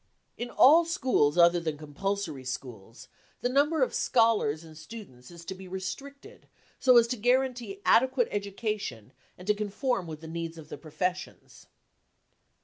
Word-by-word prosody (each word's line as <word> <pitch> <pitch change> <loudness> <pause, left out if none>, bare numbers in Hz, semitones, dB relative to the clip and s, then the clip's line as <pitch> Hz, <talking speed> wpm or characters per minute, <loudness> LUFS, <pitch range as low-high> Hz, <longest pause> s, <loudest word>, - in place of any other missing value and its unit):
In 240 - -5
all 310 +7 +6
schools 260 - +1
other 170 0 +6
than 160 -3 -3
compulsory 155 0 -4
schools, 125 -4 -8 0.3
the 245 - 0
number 290 +3 +2
of - - -1
scholars 225 - +2
and 160 -1 -13
students 155 - -11
is 170 -1 -12
to 190 - -5
be 190 0 -11
restricted 280 - -8 0.3
so 255 -2 +6
as 235 - +7
to 250 - -2
guarantee 245 -3 0
adequate 260 -1 +4
education 200 - -4 0.2
and 180 - -12
to 210 - +3
conform 210 0 -2
with 155 -1 -7
the 160 - -9
needs 165 0 -5
of 155 -2 -12
the - - -7
professions. 180 +4 -5
195 Hz, 150 wpm, -28 LUFS, 160-245 Hz, 0.3 s, as